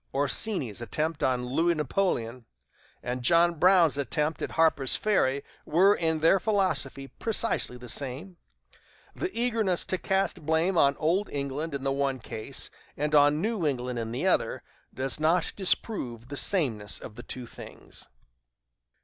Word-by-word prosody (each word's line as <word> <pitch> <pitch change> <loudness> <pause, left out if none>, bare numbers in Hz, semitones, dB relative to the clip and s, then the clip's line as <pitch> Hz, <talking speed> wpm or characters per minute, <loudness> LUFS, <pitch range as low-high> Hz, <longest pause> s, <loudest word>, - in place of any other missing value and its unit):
Orsini's 140 - 0
attempt 155 +6 -2
on 125 -1 +1
Louis 165 +7 +1
Napoleon 130 - -1 0.6
and 125 +1 -3
John 170 +5 +3
Brown's 175 -5 +5
attempt 150 +4 -1
at - - -2
Harper's 155 -5 +3
Ferry 140 -10 +1 0.2
were, 185 +6 +4
in 160 -4 -1
their 165 +4 +5
philosophy, 165 -10 0
precisely 225 - -1
the 125 0 -11
same. 140 - -4 0.8
The 365 - -2
eagerness 225 -7 +1
to 185 -2 -2
cast 190 -3 -1
blame 160 +5 +1
on 140 -4 +3
old 180 +7 0
England 140 +2 -4
in 135 - -5
the 135 - 0
one 135 -1 -1
case, 110 -2 -5 0.3
and 150 +1 -1
on 145 +1 +4
New 220 -4 -1
England 125 -3 -2
in 115 0 -4
the 120 - -3
other, - - +1 0.3
does 135 +2 -1
not 160 +3 +1
disprove 130 - -1
the 145 - -5
sameness 125 - +1
of - - -10
the - - -9
two 125 -1 -6
things." - - -12
150 Hz, 150 wpm, -27 LUFS, 130-180 Hz, 0.8 s, Brown's